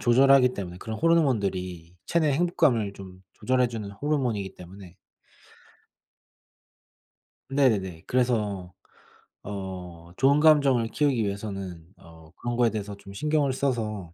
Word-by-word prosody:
조절하기 125 Hz, +1 st, +5 dB
때문에 90 Hz, -2 st, -6 dB
그런 110 Hz, +1 st, -6 dB
호르몬들이 100 Hz, -, 0 dB
체내 160 Hz, -4 st, +2 dB
행복감을 140 Hz, -, +1 dB
좀 95 Hz, -1 st, -12 dB
조절해 125 Hz, +3 st, +1 dB
주는 110 Hz, -4 st, -6 dB
호르몬이기 115 Hz, -4 st, -2 dB
때문에 90 Hz, 0 st, -12 dB, 2.5 s
네네. 105 Hz, -12 st, +1 dB
그래서 105 Hz, -8 st, 0 dB, 0.7 s
어 90 Hz, -4 st, -7 dB
좋은 140 Hz, +3 st, +4 dB
감정을 140 Hz, -6 st, +4 dB
키우기 135 Hz, -1 st, +1 dB
위해서는 100 Hz, -4 st, -5 dB
어 80 Hz, -2 st, -17 dB
그런 120 Hz, 0 st, -3 dB
거에 120 Hz, -1 st, +3 dB
대해서 105 Hz, -1 st, -5 dB
좀 100 Hz, 0 st, -13 dB
신경을 150 Hz, +4 st, +1 dB
써서 110 Hz, -10 st, -2 dB
110 Hz, 280 characters per minute, -26 LUFS, 95-135 Hz, 2.5 s, 조절하기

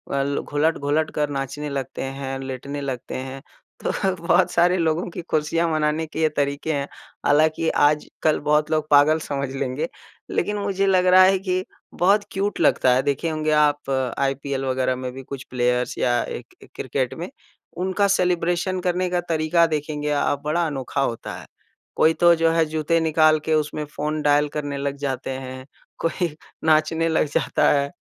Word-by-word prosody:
अल 140 Hz, +1 st, 0 dB
घुलट-घुलट 150 Hz, 0 st, 0 dB
कर 150 Hz, -1 st, 0 dB
नाचने 140 Hz, +1 st, -4 dB
लगते 135 Hz, -2 st, -4 dB
हैं, 135 Hz, 0 st, -4 dB
लेटने 135 Hz, +2 st, -5 dB
लगते 130 Hz, -3 st, -5 dB
हैं। 130 Hz, +1 st, -6 dB, 0.4 s
तो -, -, 0 dB, 0.3 s
बहुत -, -, +3 dB
सारे 175 Hz, +2 st, +3 dB
लोगों 165 Hz, 0 st, 0 dB
की 175 Hz, -, -6 dB
खुशियाँ 165 Hz, 0 st, 0 dB
मनाने 155 Hz, +1 st, 0 dB
के 155 Hz, -, -5 dB
ये 155 Hz, -, +4 dB
तरीके 140 Hz, +2 st, -1 dB
हैं। 140 Hz, -1 st, -2 dB, 0.4 s
हालाँकि 155 Hz, +2 st, +3 dB
आजकल 150 Hz, +1 st, +1 dB
बहुत 150 Hz, +1 st, +2 dB
लोग 155 Hz, -1 st, 0 dB
पागल 145 Hz, +2 st, +5 dB
समझ 140 Hz, -2 st, -3 dB
लेंगे। 135 Hz, -, -2 dB, 0.4 s
लेकिन 210 Hz, -, -1 dB
मुझे 195 Hz, -1 st, 0 dB
लग 185 Hz, -1 st, +3 dB
रहा 185 Hz, +1 st, +7 dB
है 190 Hz, 0 st, +4 dB
कि 185 Hz, -1 st, -1 dB, 0.3 s
बहुत 200 Hz, +4 st, +3 dB
क्यूट 200 Hz, +2 st, -2 dB
लगता 130 Hz, -, +4 dB
है। 130 Hz, -, +3 dB
देखे 145 Hz, +4 st, -1 dB
होंगे 155 Hz, -1 st, -1 dB
आप 150 Hz, -2 st, +2 dB, 0.3 s
आईपीएल 135 Hz, 0 st, -1 dB
वग़ैरह 130 Hz, -1 st, 0 dB
में 130 Hz, 0 st, -5 dB
भी 135 Hz, +1 st, -8 dB
कुछ 135 Hz, 0 st, -7 dB
प्लेयर्स 125 Hz, 0 st, 0 dB
या 120 Hz, -1 st, +2 dB
एक -, -, -8 dB
एक -, -, -18 dB
क्रिकेट -, -, -2 dB
में, -, -, -6 dB, 0.5 s
उनका 190 Hz, +3 st, +1 dB
सेलिब्रेशन 180 Hz, -1 st, +1 dB
करने 180 Hz, 0 st, 0 dB
का 175 Hz, 0 st, 0 dB
तरीका 165 Hz, +1 st, +3 dB
देखेंगे 150 Hz, -1 st, -3 dB
आप, 145 Hz, -1 st, 0 dB
बड़ा 170 Hz, +3 st, +1 dB
अनोखा 135 Hz, -4 st, -3 dB
होता 120 Hz, -4 st, -3 dB
है। -, -, -12 dB, 0.5 s
कोई 160 Hz, +1 st, +4 dB
तो 175 Hz, +1 st, +5 dB
जो 165 Hz, 0 st, +2 dB
है 165 Hz, 0 st, +3 dB
जूते 155 Hz, +1 st, 0 dB
निकाल 155 Hz, -1 st, +4 dB
के 160 Hz, -, +1 dB
उसमें 150 Hz, 0 st, 0 dB
फ़ोन 150 Hz, +1 st, -3 dB
डायल 145 Hz, 0 st, +3 dB
करने 145 Hz, -1 st, -4 dB
लग 140 Hz, 0 st, -2 dB
जाते 135 Hz, -2 st, -3 dB
हैं, 130 Hz, 0 st, -7 dB, 0.3 s
कोई 170 Hz, +1 st, 0 dB, 0.4 s
नाचने 160 Hz, +1 st, +3 dB
लग 160 Hz, -, +2 dB
जाता -, -, +2 dB
है। 140 Hz, -1 st, +1 dB
150 Hz, 175 wpm, -23 LUFS, 140-165 Hz, 0.5 s, रहा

